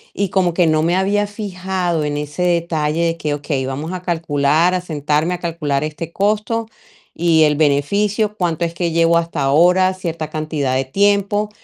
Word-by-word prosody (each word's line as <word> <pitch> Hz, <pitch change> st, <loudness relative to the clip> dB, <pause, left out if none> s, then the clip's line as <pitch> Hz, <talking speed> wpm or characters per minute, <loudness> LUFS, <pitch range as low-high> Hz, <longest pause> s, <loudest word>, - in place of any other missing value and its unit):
y 200 Hz, -1 st, -1 dB
como 180 Hz, -3 st, +1 dB
que 175 Hz, -, +3 dB
no 155 Hz, -1 st, +2 dB
me 170 Hz, +3 st, +1 dB
había 205 Hz, +2 st, +1 dB
fijado 185 Hz, -5 st, -3 dB
en 145 Hz, 0 st, -2 dB
ese 150 Hz, +2 st, -5 dB
detalle 170 Hz, -2 st, 0 dB
de 165 Hz, 0 st, -1 dB
que: 150 Hz, -2 st, -2 dB
"Okey, 140 Hz, -2 st, -3 dB
vamos 145 Hz, +6 st, -4 dB
a 185 Hz, -, -5 dB
calcular, 160 Hz, -1 st, +1 dB
a 185 Hz, -, 0 dB
sentarme 155 Hz, +1 st, -1 dB
a -, -, -9 dB
calcular 155 Hz, -5 st, -2 dB
este 155 Hz, +2 st, -5 dB
costo 215 Hz, +4 st, 0 dB, 0.5 s
y 165 Hz, -1 st, +3 dB
el 150 Hz, -1 st, +3 dB
beneficio, 200 Hz, +9 st, +1 dB
cuánto 170 Hz, -3 st, -1 dB
es 165 Hz, -, -4 dB
que 170 Hz, 0 st, -2 dB
llevo 165 Hz, 0 st, +3 dB
hasta 170 Hz, -3 st, -2 dB
ahora, 180 Hz, +7 st, +4 dB
cierta 170 Hz, -4 st, -5 dB
cantidad 155 Hz, -4 st, -2 dB
de 130 Hz, 0 st, 0 dB
tiempo 205 Hz, +5 st, +1 dB
170 Hz, 180 wpm, -18 LUFS, 150-185 Hz, 0.5 s, ahora